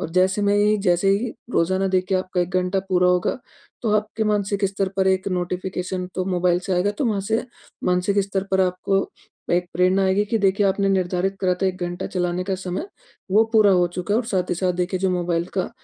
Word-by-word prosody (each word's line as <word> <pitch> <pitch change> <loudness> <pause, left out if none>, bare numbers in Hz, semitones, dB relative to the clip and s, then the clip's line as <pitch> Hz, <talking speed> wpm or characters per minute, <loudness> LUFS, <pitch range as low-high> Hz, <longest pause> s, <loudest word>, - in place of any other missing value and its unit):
और 160 - -4
जैसे 185 +3 +2
में 200 0 +3
ही 210 +1 +3
जैसे 175 +3 +3
ही, 220 +4 0 0.2
रोज़ाना 190 0 +1
देखिए 185 0 +1
आपका 185 0 -2
1 175 0 -1
घंटा 180 +2 -1
पूरा 180 -1 +3
होगा, 180 +6 +1 0.4
तो 225 - 0
आपके 215 +1 -2
मानसिक 205 -1 0
स्तर 195 0 -2
पर 190 - +2
1 190 +1 +1
नोटिफ़िकेशन 180 0 -3
तो 185 - -1
मोबाइल 180 -1 +1
से 190 +1 -3
आएगा 180 +3 +2
तो 210 - -3
वहाँ 210 -3 0
से 225 +1 0 0.4
मानसिक 180 +2 +1
स्तर 195 -1 -2
पर 190 - +3
आपको, 185 +1 0 0.4
एक 175 +1 +1
प्रेरणा 185 +2 +2
आएगी 190 +2 +2
कि 225 - +2
देखिए 200 0 +2
आपने 195 +1 +1
निर्धारित 190 0 0
करा 185 -2 +2
था - - +3
1 185 -1 -1
घंटा 175 0 -4
चलाने 180 0 -2
का 190 0 -1
समय, 185 - -4 0.4
वो 215 +4 +5
पूरा 215 -3 +6
हो 180 -1 +4
चुका 180 +4 -3
है - - +4
और 250 - -7
साथ 185 -5 -1
ही - - +1
साथ 180 +1 0
देखिए, 185 +1 -2
जो 190 -1 +1
मोबाइल 175 -1 0
का, 185 -2 -1
190 Hz, 220 wpm, -22 LUFS, 180-200 Hz, 0.4 s, पूरा